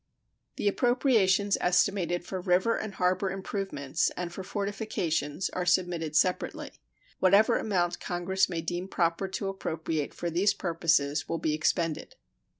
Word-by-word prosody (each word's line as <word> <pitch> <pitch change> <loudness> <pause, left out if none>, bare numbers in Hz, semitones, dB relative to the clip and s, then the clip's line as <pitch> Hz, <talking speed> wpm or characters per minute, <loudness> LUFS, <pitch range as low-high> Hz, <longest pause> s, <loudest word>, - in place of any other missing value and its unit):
The - - -1
appropriations 205 -4 +2
estimated 180 -1 +1
for 185 0 -4
river 185 +5 +2
and 215 -3 -5
harbor 185 +2 +1
improvements 190 -7 -2
and 175 -1 -4
for 190 - -6
fortifications 195 -5 -2
are 180 - -2
submitted 175 -3 0
separately. 180 +3 0 0.5
Whatever 200 +3 +5
amount 175 -4 0
Congress 185 +2 0
may 170 -2 -2
deem 175 +3 -3
proper 170 0 0
to 195 +1 -4
appropriate 160 -5 -3
for 170 - -3
these 185 +5 +2
purposes 165 -4 0
will 165 - -1
be 155 -1 -1
expended. 160 +1 -1
180 Hz, 135 wpm, -28 LUFS, 165-195 Hz, 0.5 s, Whatever